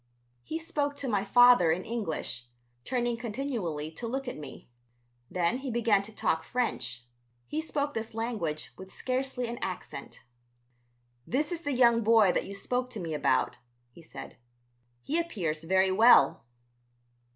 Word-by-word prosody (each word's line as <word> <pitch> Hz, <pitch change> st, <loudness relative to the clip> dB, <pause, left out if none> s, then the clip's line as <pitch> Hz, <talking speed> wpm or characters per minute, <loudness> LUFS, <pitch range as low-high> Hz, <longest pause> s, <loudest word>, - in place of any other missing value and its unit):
He 315 Hz, -, -4 dB
spoke 295 Hz, -4 st, -2 dB
to 285 Hz, -1 st, -4 dB
my 205 Hz, -5 st, +1 dB
father 245 Hz, -5 st, +6 dB
in 180 Hz, +3 st, -1 dB
English, 160 Hz, -, -3 dB, 0.4 s
turning 240 Hz, -2 st, 0 dB
continually 215 Hz, -, -3 dB
to 230 Hz, +8 st, -6 dB
look 265 Hz, +3 st, -3 dB
at 250 Hz, -, -4 dB
me. 145 Hz, -3 st, -10 dB, 0.6 s
Then 180 Hz, +7 st, 0 dB
he 270 Hz, 0 st, -5 dB
began 230 Hz, -4 st, +3 dB
to 205 Hz, +2 st, -9 dB
talk 160 Hz, -6 st, 0 dB
French; 125 Hz, -, -3 dB, 0.4 s
he 310 Hz, -, -2 dB
spoke 290 Hz, -2 st, -2 dB
this 225 Hz, 0 st, -4 dB
language 215 Hz, -10 st, -3 dB
with 190 Hz, 0 st, -10 dB
scarcely 255 Hz, -1 st, -2 dB
an 235 Hz, +1 st, -5 dB
accent. 180 Hz, -6 st, -6 dB, 1.0 s
"This 295 Hz, +6 st, 0 dB
is 340 Hz, -1 st, -3 dB
the 290 Hz, -, -2 dB
young 235 Hz, -2 st, +5 dB
boy 220 Hz, -3 st, +5 dB
that -, -, -1 dB
you 200 Hz, -, -6 dB
spoke 250 Hz, +5 st, -2 dB
to 240 Hz, -4 st, -6 dB
me 165 Hz, -3 st, -4 dB
about?" 150 Hz, -, +1 dB, 0.3 s
he 170 Hz, -, -15 dB
said. 165 Hz, -, -10 dB, 0.7 s
"He 320 Hz, +4 st, 0 dB
appears 170 Hz, -, -2 dB
very 190 Hz, +2 st, +3 dB
well." 220 Hz, -, +6 dB
230 Hz, 150 wpm, -29 LUFS, 175-255 Hz, 1.0 s, father